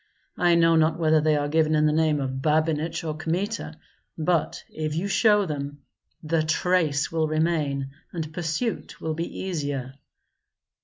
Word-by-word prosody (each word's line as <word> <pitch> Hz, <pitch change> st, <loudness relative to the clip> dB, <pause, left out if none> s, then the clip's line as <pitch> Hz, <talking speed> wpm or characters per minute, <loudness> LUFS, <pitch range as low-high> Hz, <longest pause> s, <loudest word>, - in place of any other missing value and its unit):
I 175 Hz, -1 st, +4 dB
know 165 Hz, 0 st, +4 dB
not 160 Hz, 0 st, +3 dB
whether 155 Hz, -2 st, +3 dB
they 155 Hz, 0 st, +3 dB
are 145 Hz, 0 st, 0 dB
given 155 Hz, +1 st, +2 dB
in 150 Hz, 0 st, +3 dB
the 150 Hz, -, +3 dB
name 155 Hz, -1 st, +2 dB
of 130 Hz, -1 st, -3 dB
Babinich 155 Hz, +2 st, 0 dB
or 155 Hz, -2 st, -3 dB
Kmita; 170 Hz, +3 st, -3 dB, 0.4 s
but 165 Hz, 0 st, 0 dB
if 155 Hz, -1 st, -4 dB
you 175 Hz, +5 st, -1 dB
show 210 Hz, +1 st, +4 dB
them, 145 Hz, -3 st, -5 dB, 0.4 s
the 160 Hz, +1 st, +1 dB
trace 155 Hz, -2 st, +1 dB
will 160 Hz, -1 st, +1 dB
remain 155 Hz, -4 st, 0 dB, 0.2 s
and 160 Hz, -2 st, -5 dB
pursuit 175 Hz, +7 st, -3 dB
will 160 Hz, -, -2 dB
be 165 Hz, +2 st, -5 dB
easier." 145 Hz, -8 st, -3 dB
155 Hz, 155 wpm, -25 LUFS, 150-165 Hz, 0.4 s, I